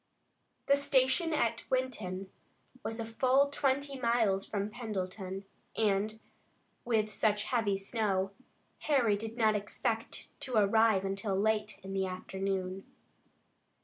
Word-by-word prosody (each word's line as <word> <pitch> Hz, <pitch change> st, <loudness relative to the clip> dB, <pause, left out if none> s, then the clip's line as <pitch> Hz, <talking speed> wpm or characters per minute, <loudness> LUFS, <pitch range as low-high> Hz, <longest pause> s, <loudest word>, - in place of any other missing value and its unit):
The 280 Hz, -, +5 dB
station 280 Hz, +3 st, +2 dB
at 230 Hz, -7 st, +1 dB
Winton 205 Hz, -8 st, -2 dB, 0.5 s
was 225 Hz, +1 st, -3 dB
a 230 Hz, -, -2 dB
full 255 Hz, +4 st, +3 dB
twenty 280 Hz, -1 st, 0 dB
miles 225 Hz, -5 st, +2 dB
from 205 Hz, 0 st, -2 dB
Pendleton 195 Hz, -4 st, -4 dB, 0.3 s
and, 215 Hz, +1 st, +1 dB, 0.6 s
with 215 Hz, -3 st, +1 dB
such 210 Hz, -1 st, +2 dB
heavy 220 Hz, -5 st, +1 dB
snow, 195 Hz, -2 st, 0 dB, 0.5 s
Harry 250 Hz, -8 st, +3 dB
did 225 Hz, +3 st, -6 dB
not 220 Hz, -2 st, +4 dB
expect 210 Hz, 0 st, -3 dB
to 255 Hz, -3 st, -4 dB
arrive 215 Hz, -1 st, +4 dB
until 195 Hz, +1 st, -1 dB
late 215 Hz, +1 st, +1 dB
in 195 Hz, 0 st, -6 dB
the 190 Hz, -1 st, 0 dB
afternoon. 190 Hz, 0 st, -3 dB
215 Hz, 115 wpm, -32 LUFS, 195-240 Hz, 0.6 s, The